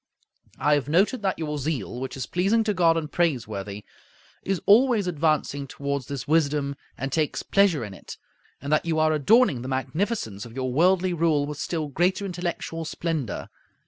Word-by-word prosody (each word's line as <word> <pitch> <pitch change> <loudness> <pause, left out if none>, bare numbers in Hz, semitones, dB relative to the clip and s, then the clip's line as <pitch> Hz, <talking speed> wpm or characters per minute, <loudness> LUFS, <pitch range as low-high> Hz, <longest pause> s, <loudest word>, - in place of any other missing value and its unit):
I 150 - +2
have 145 -2 0
noted 200 - +2
that 190 -2 0
your 150 -2 -3
zeal, 130 -5 -3
which 130 +1 -5
is 130 - -3
pleasing 195 +6 +1
to 215 -1 0
God 170 -3 +3
and 155 -2 -3
praiseworthy, 105 - -2 0.6
is 195 -2 -1
always 230 -1 +5
advancing 155 -4 0
toward 140 0 -3
this 140 -1 -6
wisdom 145 -2 +1 0.2
and 135 +2 -4
takes 155 +1 0
pleasure 190 - +2
in 105 - -8
it, - - -10 0.4
and 140 +2 -2
that 155 - +2
you 160 -1 0
are 155 0 +3
adorning 155 - +4
the 130 - -6
magnificence 135 - -2
of 115 0 -11
your 130 -1 -2
worldly 180 +4 +3
rule 160 -4 +2
with 145 0 -6
still 160 -3 -2
greater 180 +7 0
intellectual 175 -2 -4
splendor. 160 -6 -3
155 Hz, 175 wpm, -25 LUFS, 140-180 Hz, 0.6 s, always